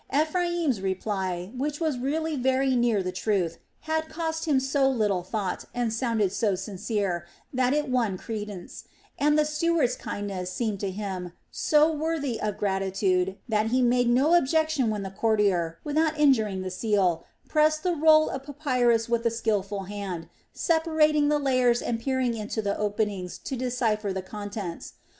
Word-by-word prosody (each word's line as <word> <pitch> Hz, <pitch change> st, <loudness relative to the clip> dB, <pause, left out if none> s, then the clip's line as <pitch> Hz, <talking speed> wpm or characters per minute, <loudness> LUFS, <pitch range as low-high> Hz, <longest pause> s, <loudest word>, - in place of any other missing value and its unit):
Ephraim's 320 Hz, -, +1 dB
reply, 190 Hz, -1 st, -2 dB
which 290 Hz, +3 st, -2 dB
was 310 Hz, -6 st, -1 dB
really 310 Hz, +4 st, -1 dB
very 265 Hz, 0 st, +2 dB
near 235 Hz, -5 st, +2 dB
the 185 Hz, -, -2 dB
truth, 180 Hz, -3 st, -1 dB, 0.2 s
had 315 Hz, 0 st, -2 dB
cost 320 Hz, 0 st, -3 dB
him 290 Hz, -4 st, +3 dB
so 270 Hz, +1 st, +2 dB
little 210 Hz, -8 st, +1 dB
thought 190 Hz, +1 st, -3 dB
and 240 Hz, -2 st, 0 dB
sounded 225 Hz, -5 st, 0 dB
so 205 Hz, -1 st, +1 dB
sincere, 190 Hz, -2 st, -2 dB, 0.3 s
that 255 Hz, 0 st, +2 dB
it 295 Hz, +1 st, +1 dB
won 235 Hz, -7 st, 0 dB
credence, 210 Hz, -4 st, -7 dB, 0.3 s
and 295 Hz, +1 st, +3 dB
the 305 Hz, -, +4 dB
steward's 305 Hz, -4 st, +1 dB
kindness 190 Hz, -3 st, -4 dB
seemed 215 Hz, -2 st, -2 dB
to 200 Hz, -, -2 dB
him 185 Hz, -3 st, -5 dB, 0.2 s
so 305 Hz, +1 st, +3 dB
worthy 300 Hz, -6 st, -2 dB
of 210 Hz, -1 st, -2 dB
gratitude 190 Hz, -1 st, 0 dB
that 215 Hz, -1 st, +1 dB
he 250 Hz, +3 st, +2 dB
made 245 Hz, 0 st, +3 dB
no 270 Hz, +7 st, +4 dB
objection 315 Hz, -5 st, +2 dB
when 210 Hz, -2 st, -2 dB
the 190 Hz, -, -5 dB
courtier, 195 Hz, -6 st, +1 dB
without 310 Hz, +1 st, +1 dB
injuring 220 Hz, -10 st, +3 dB
the 185 Hz, -, -4 dB
seal, 190 Hz, -4 st, +1 dB, 0.2 s
pressed 310 Hz, 0 st, +2 dB
the 360 Hz, -1 st, +1 dB
roll 310 Hz, 0 st, +5 dB
of 265 Hz, -, -4 dB
papyrus 255 Hz, -5 st, +1 dB
with 235 Hz, -1 st, 0 dB
a -, -, +4 dB
skilful 205 Hz, -3 st, -1 dB
hand, 190 Hz, -4 st, -5 dB, 0.2 s
separating 315 Hz, -2 st, +2 dB
the 300 Hz, -, +3 dB
layers 255 Hz, -4 st, +2 dB
and 230 Hz, -1 st, -2 dB
peering 260 Hz, -1 st, 0 dB
into 215 Hz, 0 st, -4 dB
the 200 Hz, -2 st, 0 dB
openings 205 Hz, -3 st, -2 dB
to 270 Hz, -, -5 dB
decipher 235 Hz, -5 st, -1 dB
the 190 Hz, 0 st, -3 dB
contents. 205 Hz, -3 st, -6 dB
230 Hz, 160 wpm, -26 LUFS, 200-290 Hz, 0.3 s, roll